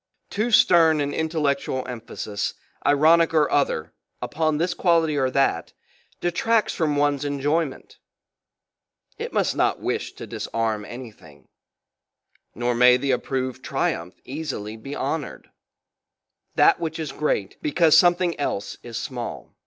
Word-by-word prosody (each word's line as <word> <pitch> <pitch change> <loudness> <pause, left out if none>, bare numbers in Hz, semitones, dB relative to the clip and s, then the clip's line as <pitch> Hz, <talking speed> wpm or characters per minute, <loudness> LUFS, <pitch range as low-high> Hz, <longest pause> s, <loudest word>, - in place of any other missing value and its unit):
Too 215 +4 0
stern 165 -7 +5
an 145 0 -1
intellectual 140 -5 -1
emphasis, 115 -4 -5 0.3
i - - +3
ronic 165 +3 +4
or 150 -2 +3
other 110 - 0 0.3
upon 155 -1 -1
this 175 +3 0
quality 165 -4 +2
or 135 -2 +1
that, 130 -11 0 0.5
detracts 215 +5 +1
from 155 -4 0
one's 145 -1 +1
enjoyment; 145 +1 -2 1.2
it - - -4
must - - 0
not - - +1
wish - - -3
to - - -9
disarm 110 -2 -3
anything; 105 - -12 1.1
nor 120 +2 0
may 125 +1 +6
the 135 +1 -1
approved 130 0 -2
tri - - 0
umph 85 +2 -9
easily 130 -7 -5
be 135 +6 -8
honoured 145 +2 -4 1.0
that - - +5
which 160 -1 -3
is 155 -4 -4
great 135 -9 -2
because 160 +1 +4
something 175 -2 +4
else 100 -8 -3
is 120 -1 -7
small. 120 -1 -6
145 Hz, 130 wpm, -23 LUFS, 125-160 Hz, 1.2 s, may